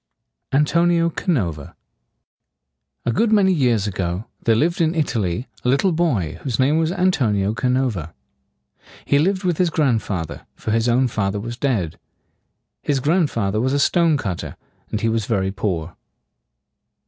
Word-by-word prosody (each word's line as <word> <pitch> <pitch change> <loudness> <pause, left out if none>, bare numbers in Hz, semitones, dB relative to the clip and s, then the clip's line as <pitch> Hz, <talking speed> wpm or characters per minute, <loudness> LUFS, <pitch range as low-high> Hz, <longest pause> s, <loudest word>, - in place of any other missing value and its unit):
ANTONIO 170 +4 +3
CANOVA. 90 - -2 1.3
A - - +1
good 225 - +1
many 195 -3 +4
years 120 - +2
ago 90 0 -3 0.2
there 115 - +4
lived 170 - +1
in 165 +1 +2
Italy 115 - -1 0.2
a 125 - +1
little 140 +9 +3
boy 155 - 0
whose 125 -6 -2
name 145 +5 +3
was 160 -1 +1
An 185 0 +2
to´ni 105 - +1
o 105 - 0
Ca 115 +3 -1
no´va. 125 - 0 0.9
He 140 - +3
lived 190 +5 +1
with 175 -3 0
his 180 -2 +3
grand 140 -8 +1
fa 90 -5 -3
ther, - - -11
for 110 - -4
his 115 +2 +2
own 125 +2 +3
father 100 -3 -1
was 120 +3 -5
dead. 115 - -1 0.8
His 140 -2 0
grand 155 +3 +2
fa 100 -7 -1
ther 105 +2 0
was 130 +2 0
a 145 - +2
stone 165 0 +3
cut 95 - -3
ter, - - -7 0.3
and 110 - -3
he 115 - +1
was 110 -2 0
very 95 -4 0
poor. 90 -5 -3
125 Hz, 170 wpm, -21 LUFS, 105-160 Hz, 1.3 s, many